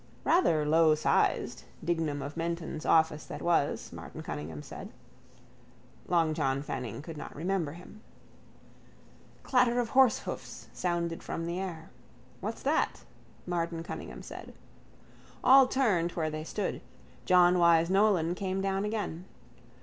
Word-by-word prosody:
—Rather 165 Hz, -, +3 dB
lowsized. 155 Hz, 0 st, +2 dB, 0.2 s
Dignam 160 Hz, -4 st, -1 dB
of 140 Hz, +2 st, -6 dB
Menton's 165 Hz, -1 st, -3 dB
office 160 Hz, -1 st, +3 dB
that -, -, -7 dB
was, 170 Hz, -4 st, 0 dB
Martin -, -, -8 dB
Cunningham 75 Hz, 0 st, -6 dB
said. -, -, -9 dB, 1.2 s
Long 165 Hz, -3 st, +2 dB
John 140 Hz, -3 st, 0 dB
Fanning 125 Hz, -2 st, -5 dB
could 160 Hz, -1 st, -8 dB
not -, -, -8 dB
remember 170 Hz, -2 st, -1 dB
him. 180 Hz, +5 st, -13 dB, 1.4 s
Clatter 250 Hz, -2 st, +3 dB
of 235 Hz, -2 st, -1 dB
horsehoofs 260 Hz, -4 st, +1 dB
sounded 170 Hz, -2 st, -2 dB
from 165 Hz, -, -4 dB
the 170 Hz, +2 st, -3 dB
air. 170 Hz, -4 st, -6 dB, 0.5 s
—What's -, -, -5 dB
that? -, -, 0 dB, 0.4 s
Martin 170 Hz, -1 st, -2 dB
Cunningham -, -, -7 dB
said. -, -, -10 dB, 0.9 s
All 265 Hz, 0 st, +8 dB
turned 200 Hz, -11 st, +1 dB
where 155 Hz, -2 st, -1 dB
they 155 Hz, 0 st, -5 dB
stood. 200 Hz, +3 st, -3 dB, 0.4 s
John 180 Hz, 0 st, +5 dB
Wyse 170 Hz, 0 st, +4 dB
Nolan 190 Hz, -4 st, +3 dB
came 190 Hz, 0 st, -2 dB
down 195 Hz, 0 st, 0 dB
again. 205 Hz, -5 st, -3 dB
170 Hz, 125 wpm, -30 LUFS, 160-195 Hz, 1.4 s, All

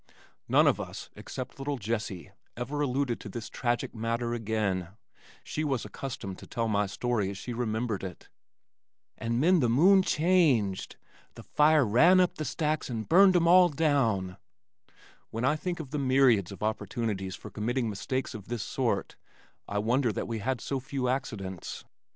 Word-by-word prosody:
None -, -, +5 dB
of -, -, +3 dB
us -, -, -8 dB
except 130 Hz, +1 st, -7 dB
little 140 Hz, +1 st, -2 dB
Jessie, 105 Hz, -4 st, -4 dB, 0.3 s
ever 135 Hz, +5 st, -3 dB
alluded 135 Hz, -3 st, 0 dB
to -, -, -8 dB
this 115 Hz, -2 st, -6 dB
tragic 120 Hz, -1 st, -2 dB
matter 115 Hz, +1 st, -2 dB
again; 105 Hz, -6 st, -1 dB, 0.6 s
she 155 Hz, -, -3 dB
was 135 Hz, -7 st, -1 dB
accustomed 105 Hz, -4 st, -6 dB
to -, -, -12 dB
tell 115 Hz, -1 st, -2 dB
my 105 Hz, -2 st, +1 dB
story 110 Hz, 0 st, -1 dB
as 100 Hz, -, -6 dB
she 120 Hz, +4 st, -6 dB
remembered 115 Hz, -3 st, -2 dB
it, 90 Hz, -3 st, -8 dB, 0.9 s
"an 115 Hz, +1 st, -1 dB
'nen 175 Hz, +5 st, +4 dB
the 125 Hz, -5 st, +2 dB
moon 185 Hz, +11 st, +6 dB
changed 150 Hz, -, +2 dB, 0.4 s
the -, -, -10 dB
fire 150 Hz, -1 st, +4 dB
ran 160 Hz, -, +5 dB
up 180 Hz, -1 st, +2 dB
the 155 Hz, -, -2 dB
stacks 155 Hz, +3 st, -1 dB
and 110 Hz, -3 st, -4 dB
burned 190 Hz, +2 st, +6 dB
'em 170 Hz, -1 st, +4 dB
all 180 Hz, +1 st, +7 dB
down 125 Hz, -, +1 dB, 0.5 s
" -, -, -27 dB
When 115 Hz, +3 st, -2 dB
I 150 Hz, +3 st, +3 dB
think 175 Hz, +2 st, -4 dB
of 145 Hz, -5 st, -7 dB
the 150 Hz, -, -2 dB
myriads 130 Hz, -8 st, +3 dB
of 100 Hz, -, -8 dB
opportunities 105 Hz, -3 st, -2 dB
for -, -, -11 dB
committing 120 Hz, +3 st, -1 dB
mistakes 130 Hz, +7 st, -3 dB
of 105 Hz, -4 st, -9 dB
this 120 Hz, -4 st, -3 dB
sort, -, -, -1 dB, 0.5 s
I 100 Hz, -, -3 dB
wonder 120 Hz, +4 st, +2 dB
that -, -, -3 dB
we 115 Hz, -1 st, -3 dB
had 125 Hz, +2 st, -2 dB
so 135 Hz, -, -2 dB
few 130 Hz, -1 st, -3 dB
accidents. 100 Hz, -9 st, -4 dB
120 Hz, 170 wpm, -29 LUFS, 110-145 Hz, 0.9 s, all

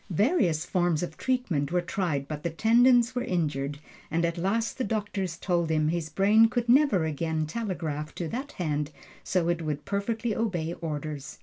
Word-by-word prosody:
Various 190 Hz, -, +2 dB
forms 175 Hz, -3 st, +1 dB
of 175 Hz, -, -5 dB
treatment 240 Hz, -, -1 dB
were 180 Hz, -, +2 dB
tried, 170 Hz, -5 st, -2 dB
but 150 Hz, -1 st, -5 dB
the 170 Hz, -, -1 dB
tendons 235 Hz, +6 st, +4 dB
were 245 Hz, -1 st, -1 dB
injured, 145 Hz, -, -1 dB, 0.3 s
and 165 Hz, +2 st, +1 dB
at 170 Hz, 0 st, -1 dB
last 220 Hz, +8 st, -1 dB
the -, -, +1 dB
doctors 200 Hz, -5 st, -2 dB
told 170 Hz, -3 st, 0 dB
him 155 Hz, -1 st, +2 dB
his 165 Hz, -1 st, -2 dB
brain 210 Hz, +7 st, +5 dB
could 240 Hz, 0 st, -1 dB
never 240 Hz, -, +4 dB
again 160 Hz, +1 st, -1 dB
telegraph 155 Hz, -5 st, -4 dB
to 170 Hz, -, -3 dB
that 265 Hz, -, -5 dB
hand 150 Hz, -4 st, -2 dB, 0.3 s
so 180 Hz, -3 st, 0 dB
it 170 Hz, -1 st, 0 dB
would 150 Hz, -2 st, -3 dB
perfectly 220 Hz, +2 st, -1 dB
obey 175 Hz, -7 st, -1 dB
orders. 150 Hz, -4 st, -5 dB
175 Hz, 175 wpm, -27 LUFS, 155-220 Hz, 0.3 s, brain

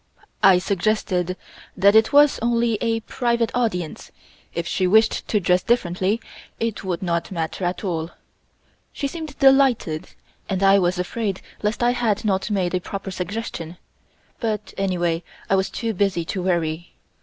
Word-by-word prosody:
I 195 Hz, -3 st, +7 dB
suggested 185 Hz, -1 st, 0 dB, 0.4 s
that 195 Hz, +2 st, +6 dB
as 205 Hz, -, +3 dB
it 220 Hz, 0 st, +5 dB
was 290 Hz, 0 st, +5 dB
only 235 Hz, -2 st, +1 dB
a 225 Hz, -1 st, 0 dB
private 235 Hz, 0 st, 0 dB
audience, 180 Hz, -10 st, -2 dB, 0.4 s
if 170 Hz, -, -3 dB
she 185 Hz, +1 st, 0 dB
wished 220 Hz, +3 st, +3 dB
to 210 Hz, -, +2 dB
dress 180 Hz, -1 st, +2 dB
differently, 190 Hz, -1 st, +1 dB, 0.4 s
it 230 Hz, -2 st, -2 dB
would 185 Hz, -1 st, -3 dB
not 170 Hz, 0 st, -1 dB
matter 170 Hz, +1 st, -3 dB
at 180 Hz, +4 st, -2 dB
all. 165 Hz, -4 st, -2 dB, 0.8 s
She 280 Hz, -, -3 dB
seemed 310 Hz, -1 st, -7 dB
delighted, 270 Hz, -, +3 dB, 0.4 s
and 190 Hz, -1 st, -1 dB
I 195 Hz, 0 st, +6 dB
was 180 Hz, 0 st, +1 dB
afraid 195 Hz, +2 st, -3 dB, 0.2 s
lest 215 Hz, +3 st, -1 dB
I 240 Hz, -, +4 dB
had 225 Hz, -4 st, 0 dB
not 190 Hz, +1 st, 0 dB
made 190 Hz, -4 st, 0 dB
a 180 Hz, -, 0 dB
proper 195 Hz, +1 st, -6 dB
suggestion, 180 Hz, -3 st, -5 dB, 0.6 s
but 215 Hz, -3 st, -3 dB
anyway 175 Hz, -4 st, 0 dB, 0.3 s
I -, -, +5 dB
was 190 Hz, 0 st, +1 dB
too 230 Hz, -2 st, -3 dB
busy 190 Hz, -4 st, 0 dB
to 185 Hz, -, -3 dB
worry. 170 Hz, -2 st, -1 dB
195 Hz, 155 wpm, -22 LUFS, 180-225 Hz, 0.8 s, I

